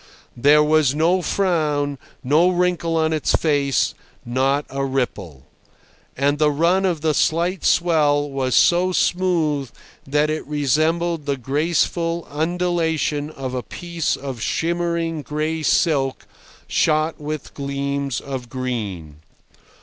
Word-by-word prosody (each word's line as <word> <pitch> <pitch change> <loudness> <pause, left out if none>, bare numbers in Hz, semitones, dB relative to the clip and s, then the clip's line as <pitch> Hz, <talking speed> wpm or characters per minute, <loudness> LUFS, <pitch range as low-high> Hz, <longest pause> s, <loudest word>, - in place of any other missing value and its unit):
There 145 +5 +5
was 150 -2 +3
no 170 +4 +2
frown, 150 -7 0 0.2
no 155 +7 +4
wrinkle 175 -2 0
on 160 0 +1
its 155 - 0
face, 145 -3 +1 0.3
not 135 +4 0
a 135 0 -3
ripple. 100 - -3 0.7
And 145 +2 +1
the 150 -1 +4
run 170 +6 +2
of 170 -4 -1
the 155 -1 +1
slight 170 +5 0
swell 150 -4 +2
was 135 -3 -1
so 180 +6 +4
smooth 165 -8 +1 0.4
that 150 +2 +1
it 155 - -3
resembled 155 +3 0
the 140 -1 0
graceful 165 +5 -1
undulation 160 -2 -1
of 135 -4 -6
a 125 - -2
piece 170 +7 -3
of 135 -4 -7
shimmering 170 +1 -1
gray 155 +2 -3
silk 140 -3 +1 0.4
shot 155 +1 +1
with 150 0 -5
gleams 140 -1 -3
of 130 -3 -6
green. 105 - -4
150 Hz, 120 wpm, -21 LUFS, 140-165 Hz, 0.7 s, There